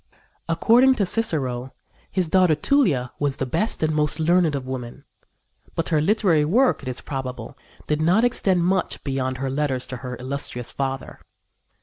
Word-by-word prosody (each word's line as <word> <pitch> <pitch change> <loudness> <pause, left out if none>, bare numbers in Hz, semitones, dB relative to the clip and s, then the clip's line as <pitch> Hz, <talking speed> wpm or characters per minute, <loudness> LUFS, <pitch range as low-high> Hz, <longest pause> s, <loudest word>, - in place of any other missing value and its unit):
According 240 +10 +4
to 205 - +1
Cicero, 135 - +1 0.4
his 185 -3 -1
daughter 180 -1 +3
Tulia 150 - +1
was 145 -2 -1
"the 135 - -2
best 210 - -2
and 155 0 +1
most 150 +1 +1
learned 165 -1 +2
of 135 -2 -4
women"; 125 -2 -7 0.7
but 165 - -2
her 155 -2 +2
literary 185 -4 +2
work, 240 - +2
it 135 - -10
is 130 -1 -4
probable, 130 -4 -6 0.3
did 150 0 -1
not 180 +8 +3
extend 190 -8 +1
much 185 +1 -1
beyond 130 -2 -2
her 135 0 -3
letters 135 -2 -1
to 130 - -7
her 125 0 -6
illustrious 125 -1 -4
father. 135 -1 -4
150 Hz, 160 wpm, -23 LUFS, 130-185 Hz, 0.7 s, According